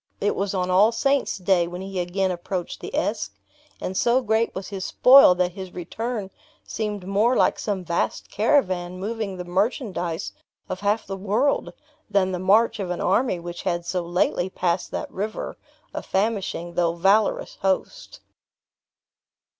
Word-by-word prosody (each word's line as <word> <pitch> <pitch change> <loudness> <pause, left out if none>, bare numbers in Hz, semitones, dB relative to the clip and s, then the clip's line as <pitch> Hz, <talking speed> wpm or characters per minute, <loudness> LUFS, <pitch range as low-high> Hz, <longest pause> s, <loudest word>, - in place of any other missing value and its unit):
It 205 - 0
was 200 0 -2
on 185 0 0
All 200 +5 +5
Saints 275 +3 +1
Day 180 -2 +2
when 175 +1 -6
he 195 -1 -4
again 185 +2 0
approached 175 0 -4
the - - -6
Esk; - - -1 0.4
and 185 - -4
so 240 +6 +3
great 220 +1 +1
was 190 0 -5
his 195 -2 -5
spoil 255 -6 +7
that 180 0 +1
his 190 -1 -9
return 210 +3 -4 0.3
seemed 210 -4 -4
more 210 +6 +2
like - - +2
some 200 -3 -2
vast 170 0 -2
caravan 185 -7 +1
moving 210 -1 -3
the 180 - -6
merchandise 185 - -1 0.4
of 185 - -4
half 205 +2 0
the 195 - -5
world, 215 +9 0 0.4
than 190 -2 +2
the 180 - -2
march 210 +5 +3
of 190 -3 -3
an 180 -1 -2
army 195 0 +1
which 175 0 -7
had 175 -2 -2
so 180 0 -1
lately 175 +1 0
passed 175 -1 -1
that - - -5
river, 210 +3 -4 0.4
a - - -3
famishing, 195 -4 -1
though 170 -1 +1
valourous 195 +5 +2
host. 195 - -2
190 Hz, 160 wpm, -24 LUFS, 180-215 Hz, 0.4 s, spoil